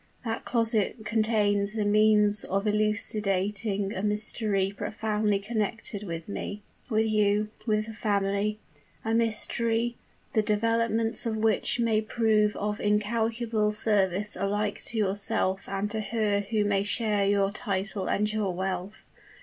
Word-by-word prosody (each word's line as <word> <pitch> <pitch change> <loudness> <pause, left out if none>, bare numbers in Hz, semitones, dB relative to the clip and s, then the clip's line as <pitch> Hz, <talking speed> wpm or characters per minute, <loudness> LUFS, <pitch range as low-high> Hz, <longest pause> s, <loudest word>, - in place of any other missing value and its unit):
That 225 0 -3
closet 225 -1 0
contains 210 -2 +1
the 215 -2 -1
means 210 0 +4
of 195 +2 -1
elucidating 210 -1 +1
a 190 - -3
mystery 210 -1 +1
profoundly 210 -1 -1
connected 210 0 -3
with 165 -5 -6
me 205 0 -5 0.3
with 220 -1 +2
you 210 -1 +2 0.2
with 215 -1 +1
the 225 - -8
family 205 0 0 0.5
a 225 - 0
mystery, 230 +1 +1 0.4
the 220 - +3
developments 230 +2 +1
of 220 -1 -1
which 220 +2 +1
may 225 -2 +2
prove 215 -1 +2
of 210 +1 -2
incalculable 220 +1 0
service 210 -2 +1
alike 205 +1 -2
to 235 - -3
yourself 195 -2 0
and 195 +1 -2
to 220 0 -2
her 210 -1 0
who 215 -2 +1
may 200 -1 +2
share 210 -1 +1
your 200 -1 +2
title 200 -2 -3
and 210 +1 0
your 210 -3 0
wealth. 190 +2 -4
210 Hz, 135 wpm, -27 LUFS, 200-220 Hz, 0.5 s, means